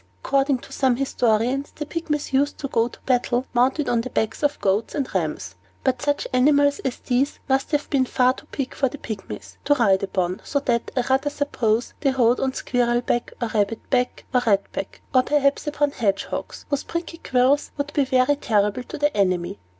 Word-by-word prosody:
According 275 0 +2
to - - -14
some 260 -3 +2
historians, 250 +1 0
the 300 - -4
Pygmies 300 -2 -3
used 285 +2 +2
to 275 - -4
go 230 -3 +1
to - - -12
the - - -34
battle, 250 0 +1
mounted 260 +5 +2
on 235 -1 +2
the 255 - -6
backs 220 -2 -1
of 290 0 +1
goats 200 +7 0
and 280 -4 -1
rams; 150 - -2 0.3
but 255 -2 +1
such 290 0 0
animals 285 +2 +4
as 260 - -3
these 260 +2 0
must 270 0 +1
have 295 -2 0
been 270 -3 +3
far 255 0 +3
too 295 - -14
big 275 -3 -3
for 270 - +1
Pygmies 225 -7 -8
to 290 - +4
ride 200 -7 +3
upon; 185 -2 -1
so 280 - 0
that, 235 -4 0
I - - +4
rather 265 +3 +1
suppose, 245 -6 -1
they 280 - +2
rode 250 -2 +3
on 265 -1 0
squirrel 240 -1 +1
back, 240 -1 -1
or 235 - -1
rabbit 215 0 -1
back, 250 -1 0
or 250 - +4
rat 200 -2 +2
back, - - -6
or 255 - +6
perhaps 280 +1 +1
got 295 -1 -3
upon 290 -1 +2
hedgehogs, 200 -7 -2
whose 285 - 0
prickly 335 0 -5
quills 260 +3 +2
would 285 +1 -3
be 285 - +3
very 260 +2 +2
terrible 210 -2 +1
to 315 +6 -8
the 295 0 +1
enemy. 185 - 0
255 Hz, 205 wpm, -23 LUFS, 230-285 Hz, 0.3 s, or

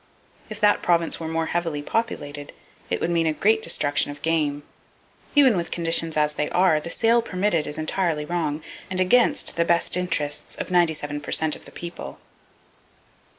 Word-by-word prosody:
If 215 -1 -7
that 210 0 +4
province 170 -1 +1
were 165 - -5
more 165 0 -1
heavily 165 -4 -2
populated, 145 -9 -3 0.4
it 90 - -1
would 170 - -1
mean 165 -1 +1
a 155 - +1
great 220 +7 +2
destruction 145 -8 +1
of 145 0 -9
game. 150 -3 0 0.7
Even 270 -6 +6
with 170 -2 -2
conditions 165 -1 +1
as 150 0 +2
they 150 0 -2
are, 180 -4 +3
the 160 - -6
sale 230 +5 +2
permitted 185 -7 -1
is 150 - -6
entirely 155 -1 -1
wrong, 155 -3 -2 0.3
and 185 0 -2
against 185 0 +3
the 170 - +3
best 170 0 +2
interests 165 -5 -2
of - - -6
97 155 -4 +1
per - - -7
cent 160 -1 +2
of - - -14
the - - -12
people. 170 0 -8
165 Hz, 175 wpm, -23 LUFS, 150-180 Hz, 0.7 s, Even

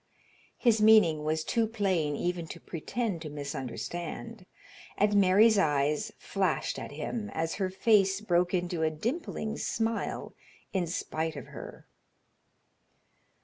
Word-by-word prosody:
His 225 -3 +3
meaning 215 -9 +6
was 155 +1 0
too 230 +4 +1
plain 190 -9 0
even 175 +1 -2
to - - -8
pretend 190 +2 -3
to 155 - -6
misunderstand, 155 - -5 0.5
and 205 +1 +3
Mary's 205 +3 +6
eyes 150 +5 +1
flashed 190 -4 -1
at - - -7
him, 210 +8 -4
as 160 0 -1
her 190 - +1
face 195 -1 +3
broke 180 -4 +1
into 175 -2 -1
a 160 - +3
dimpling 220 - -3
smile 225 0 -2 0.4
in 185 -3 0
spite 160 -1 -3
of 140 - -7
her. - - -10
180 Hz, 125 wpm, -29 LUFS, 160-215 Hz, 0.5 s, meaning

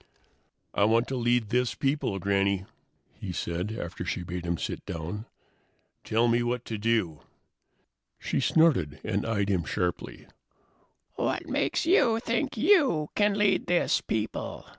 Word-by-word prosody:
"I 100 - +3
want 115 +3 +3
to 135 - -2
lead 120 -3 +1
this 125 +1 +1
people, 135 -7 0
Granny," 100 0 +1 0.5
he 95 - -5
said, 90 +3 -3
after 85 0 -5
she 90 - -3
had 90 - -9
bade 90 0 -4
him 85 0 0
sit - - -4
down. 85 +8 -5 0.8
"Tell 115 +2 +2
me 120 +1 +3
what 120 0 -2
to 110 -2 -4
do." 105 -8 0 1.0
She - - -2
snorted 145 - +3
and 105 -1 -1
eyed 100 -3 0
him 90 -4 +1
sharply. 90 +2 -3 0.9
"What - - -1
makes - - 0
you 240 - +4
think 235 +3 -1
you 270 - +3
can 205 -1 +2
lead 205 -3 +2
this 175 0 +2
people?" 110 0 -3
110 Hz, 145 wpm, -28 LUFS, 95-150 Hz, 1.0 s, you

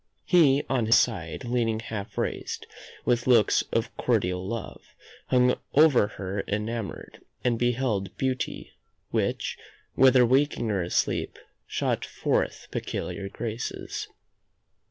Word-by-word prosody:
He 145 -6 +5
on 120 -4 0
his 115 - +7
side 85 -5 0
Leaning 115 -2 0
half 105 -2 -6
raised, - - -3 0.4
with 120 0 +1
looks 115 -5 +5
of - - -1
cordial 90 0 0
love, 115 +4 -5 0.5
Hung 125 0 +4 0.2
over 145 -8 +6
her 100 -1 -4
enamoured, 105 0 -4 0.2
and 120 -2 +1
beheld 120 -5 0
Beauty, 130 -1 -2 0.4
which, - - -1 0.3
whether 130 -1 +6
waking 130 -2 +2
or 100 -2 0
asleep, 85 - -1 0.3
Shot - - -1
forth - - -1
peculiar 100 0 -4
graces. 115 +3 -5
115 Hz, 115 wpm, -27 LUFS, 105-125 Hz, 0.5 s, his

